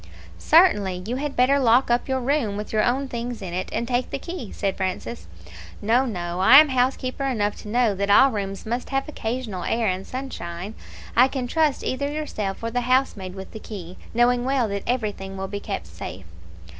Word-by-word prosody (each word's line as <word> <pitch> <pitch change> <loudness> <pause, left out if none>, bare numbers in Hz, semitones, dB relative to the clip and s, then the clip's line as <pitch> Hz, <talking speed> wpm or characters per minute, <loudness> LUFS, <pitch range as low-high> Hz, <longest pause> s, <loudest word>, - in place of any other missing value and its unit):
"Certainly; 205 - +4
you 240 +4 -2
had 290 +1 -3
better 265 +3 +4
lock 245 0 +4
up 240 - +1
your 265 0 +1
room 245 -6 0
with 210 +1 -6
your 215 -1 +3
own 265 +3 +1
things 240 -1 -4
in 185 -4 -6
it, 185 +1 -3
and 235 - -2
take 250 0 0
the - - -3
key," 275 - -7
said 195 -2 -2
Francis. 120 - -4 0.5
"No, 240 +5 +2
no; 175 -5 -4
I 220 +8 +8
am 305 0 +8
housekeeper 255 +1 0
enough 210 -6 0
to - - -11
know 230 0 +2
that 200 +1 -2
all 265 +7 +7
rooms 195 -3 -4
must 240 +3 -3
have 270 -1 -1
occasional 225 -9 -4
air 230 0 0
and 185 0 -2
sunshine. 200 -8 -6 0.4
I 250 +2 +7
can 265 -2 -3
trust 305 +2 +1
either 280 +2 -2
yourself 220 -10 -4
or 230 - -2
the 245 +1 0
housemaid 240 -7 0
with 190 0 -8
the 220 - -8
key, 185 -5 -9
knowing 240 +1 +3
well 260 -2 +1
that 200 0 -2
everything 205 -5 -2
will 190 0 -3
be 200 +1 -5
kept 85 - -4
safe." 85 +2 -8
235 Hz, 200 wpm, -24 LUFS, 195-260 Hz, 0.5 s, I